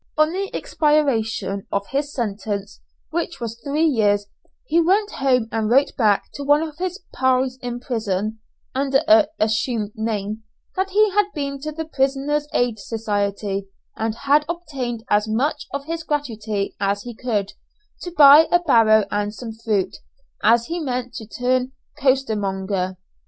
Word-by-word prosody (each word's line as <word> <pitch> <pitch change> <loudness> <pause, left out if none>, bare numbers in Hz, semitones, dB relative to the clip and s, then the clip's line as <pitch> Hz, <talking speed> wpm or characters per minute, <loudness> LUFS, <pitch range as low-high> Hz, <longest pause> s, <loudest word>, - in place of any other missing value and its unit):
On 310 +1 +4
the 390 +2 -3
expiration 225 -10 0
of 200 0 -1
his 285 +1 -1
sentence, 205 - -4 0.3
which - - -3
was 230 0 -5
three 295 +3 +1
years, 205 -8 +2 0.4
he 340 -6 +3
went 405 +5 +2
home 255 - +1
and 220 -1 -1
wrote 270 +4 +3
back 210 -4 +3
to 285 - -6
one 290 +2 +4
of 310 0 -7
his 370 +2 -3
"pals" 260 0 +1
in 245 -1 -4
prison, 220 -3 -2 0.3
under 270 +2 +1
an 320 -1 +6
assumed 215 0 0
name, 215 -1 -3 0.3
that 380 0 0
he 420 +1 +3
had 415 +1 +3
been 280 -2 -3
to 305 +1 -4
the 320 +1 -5
Prisoners' 285 +1 0
Aid 240 -3 0
Society, 200 -2 -2 0.3
and 220 0 -2
had 285 +4 +3
obtained 275 -10 -4
as 210 -2 +2
much 280 +7 -1
of 280 0 -4
his 330 +1 -3
gratuity 220 -10 -3
as 200 0 0
he 245 - -7
could, 215 -4 -2 0.5
to 355 - -5
buy 305 -1 +8
a 350 - +7
barrow 225 - +5
and 205 +1 -1
some 235 -1 -6
fruit, 220 -4 -1 0.4
as 230 +2 +4
he 340 +5 -3
meant 250 -5 -3
to 220 - -7
turn 255 +2 0 0.3
costermonger. 200 -8 0
245 Hz, 155 wpm, -22 LUFS, 215-295 Hz, 0.5 s, buy